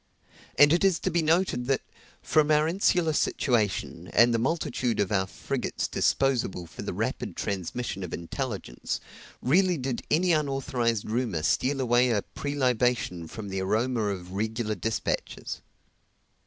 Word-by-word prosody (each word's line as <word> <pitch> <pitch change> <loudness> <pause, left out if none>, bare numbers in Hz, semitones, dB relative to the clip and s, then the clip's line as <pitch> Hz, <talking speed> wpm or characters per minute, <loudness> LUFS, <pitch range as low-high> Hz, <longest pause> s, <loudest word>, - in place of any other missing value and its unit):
And 145 +1 +7
it 170 - +2
is 190 -3 +4
to 185 - 0
be 170 0 +2
noted 160 -6 +1
that, 135 -1 +2 0.4
from 155 -1 +3
our 150 0 +4
insular 175 -2 +2
situation, 115 -8 0
and 120 0 +6
the 115 - +2
multitude 125 -3 -1
of 100 -1 +1
our 95 -2 +1
frigates - - -3
disposable 125 -10 +1
for 80 - -10
the - - -3
rapid - - -3
transmission 100 +2 -3
of 90 - -6
intelligence, 95 - -4 0.4
rarely 180 +6 +3
did 130 -2 -3
any 175 +4 +3
unauthorized 135 -7 0
rumor 110 -8 -1
steal 130 - +1
away 125 0 +3
a 105 -4 +1
prelibation 125 - 0
from 105 +3 -7
the 95 0 -2
aroma 115 +5 0
of 95 -3 -3
the - - -10
regular 110 +2 -1
dispatches. 110 +3 -3
125 Hz, 145 wpm, -27 LUFS, 105-145 Hz, 0.4 s, And